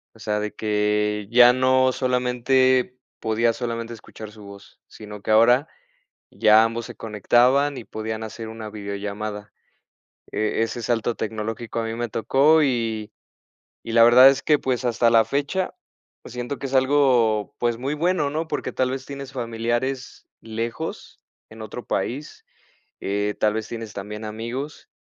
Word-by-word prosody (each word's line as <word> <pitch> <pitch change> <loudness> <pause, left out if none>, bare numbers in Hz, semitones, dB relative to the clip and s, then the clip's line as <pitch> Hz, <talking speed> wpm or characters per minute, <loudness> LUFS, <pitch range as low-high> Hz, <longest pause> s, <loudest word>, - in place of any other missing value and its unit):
O - - -18
sea, 105 0 -1
de 105 0 -4
que 105 -1 0
ya 125 +1 +7
no 130 0 +3
solamente 125 0 +1 0.2
podía 115 +1 +1
solamente 115 -1 -4
escuchar 110 -1 -11
su 105 0 -14
voz, 100 0 -14
sino 105 -1 -11
que 110 - -2
ahora 120 +6 +5 0.6
ya 110 +1 +5
ambos 115 +1 -3
se - - -10
conectaban 125 +6 +2
y 120 - -7
podían 110 0 -5
hacer 110 0 -7
una 110 -1 -8
videollamada. 105 0 -6 0.8
Eh, 110 +1 -1
ese 115 +1 -3
salto 115 0 0
tecnológico 110 +1 -4
a 115 - -2
mí 115 - -3
me 120 +1 -3
tocó 140 +9 +3
y 115 -5 -1 0.7
y 115 - -4
la 115 - +6
verdad 125 +3 +9
es 135 0 -1
que, 150 -1 +3
pues, 125 -2 -2
hasta 120 0 +2
la 115 -1 +5
fecha, 145 +9 -1 0.5
pues, - - -11
siento 125 +3 -5
que - - -9
es 135 - -4
algo, 130 -6 +3
pues, 120 -1 0
muy 130 +4 -3
bueno, 160 -1 0
¿no? 160 +2 -3
Porque 145 - -3
tal 130 0 0
vez 130 0 -5
tienes 140 -1 -8
familiares 120 +2 -3
lejos 115 +7 -6 0.3
en 110 0 -12
otro 110 +3 -7
país, 130 +10 -4 0.5
eh, 100 +1 -1
tal 105 0 +2
vez 110 -1 -3
tienes 115 -3 -7
también 105 +2 -7
amigos. 115 +7 -6
115 Hz, 160 wpm, -23 LUFS, 110-130 Hz, 0.8 s, verdad